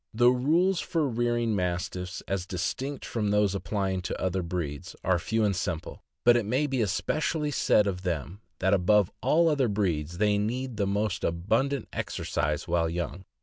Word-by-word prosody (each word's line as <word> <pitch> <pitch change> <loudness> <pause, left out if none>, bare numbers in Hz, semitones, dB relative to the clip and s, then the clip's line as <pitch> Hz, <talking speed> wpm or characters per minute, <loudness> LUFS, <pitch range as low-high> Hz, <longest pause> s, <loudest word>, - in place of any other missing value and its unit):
The 120 +2 +6
rules 165 +9 +2
for 160 -3 0
rearing 120 -2 0
Mastiffs, 90 0 -2
as 95 -2 -2
distinct 130 - -3
from 105 -3 -1
those 105 -1 +3
applying 95 0 -1
to 90 - -4
other 95 0 0
breeds, 85 -5 -4
are 95 -1 +2
few 110 +6 0
and 100 -2 +1
simple, 85 -3 -4 0.2
but 120 0 +7
it 120 - +2
may 130 +8 +1
be 135 -4 0
especially 150 - 0
said 105 -5 +3
of 95 -3 -2
them 90 +1 -3 0.2
that 95 +3 +2
above 100 +1 +3
all 155 +7 +4
other 140 -5 +2
breeds 85 -6 -1
they 105 +1 +2
need 120 +3 -2
the 100 -2 +1
most 105 +1 -1
abundant 115 +12 0
exercise - - -2
while 85 -1 +1
young. 85 +2 -4
100 Hz, 170 wpm, -28 LUFS, 90-120 Hz, 0.2 s, but